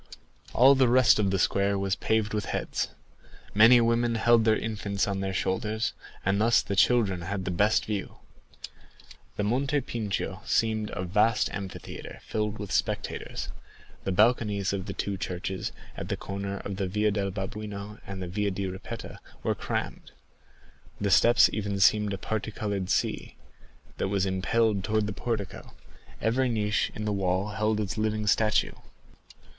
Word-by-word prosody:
All 130 +3 +7
the 130 -2 +4
rest 120 -4 +5
of 100 -2 +2
the 95 - +1
square 100 +2 +1
was 95 0 0
paved 110 0 0
with 105 -1 -1
heads. - - -2 0.7
Many 115 +4 +8
women 115 0 +2
held 115 0 +4
their 110 -1 +4
infants 105 -3 -2
on 100 -1 -2
their 95 0 -2
shoulders, 105 +4 -1 0.3
and 100 +2 +2
thus 115 +1 +4
the 100 - -3
children 95 -3 +3
had 95 +2 -4
the 90 - -1
best 105 +5 +2
view. 105 -3 -4 1.2
The 105 - -1
Monte 135 +7 +1
Pincio 110 -6 -3
seemed 110 -1 +1
a 90 - -3
vast 105 +5 +2
amphitheatre 100 -2 -7
filled 105 0 -2
with 105 -2 -6
spectators; - - -2 0.5
the 95 - -1
balconies 105 -1 +2
of 95 0 -3
the 100 - -4
two 100 0 -3
churches 95 0 -4 0.2
at - - -6
the - - -1
corner 100 0 -4
of 100 -1 -5
the 95 -1 -1
Via 105 +3 +1
del 100 -1 -1
Babuino 105 +1 -6
and 95 -1 -5
the - - -4
Via 100 +3 -1
di 100 0 -3
Ripetta 95 0 -7 0.2
were - - +1
crammed; - - -4 0.9
the 100 -1 0
steps 120 +5 +6
even 100 -2 -2
seemed 105 +2 +4
a 100 - -2
parti 110 +2 -3
colored 100 -4 -3
sea, - - -1 0.6
that - - 0
was 100 -1 0
impelled 100 +2 +1
towards 110 +2 +1
the 105 - -3
portico; 110 -3 -4 0.4
every 125 +3 +1
niche 105 -2 0
in 105 - -4
the 105 - 0
wall 95 +1 0
held 105 +1 0
its 105 +1 -2
living 110 0 0
statue. 105 +1 +2
105 Hz, 160 wpm, -27 LUFS, 95-110 Hz, 1.2 s, Many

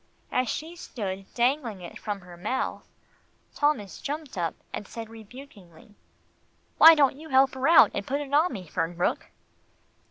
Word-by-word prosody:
As 255 -2 0
she 325 +3 -5
stood 195 - -6
dangling 240 -5 0
it 175 - -9
from 205 -2 -4
her 180 -1 -13
mouth, 215 +9 -3 0.7
Thomas 290 -10 -1
jumped 295 -1 -5
up 170 -3 -2 0.2
and 205 - -5
said 225 -1 -8
rebukingly, 215 - -14 0.9
"Why 325 +1 +10
don't 275 -3 +3
you 315 0 -11
help 265 0 +4
her 260 - -8 0.4
put 270 +8 -3
it 285 -1 -7
on 310 +5 +4
me, 195 -7 -7
Fernbrook?" 170 +2 -2
235 Hz, 145 wpm, -26 LUFS, 195-280 Hz, 0.9 s, Why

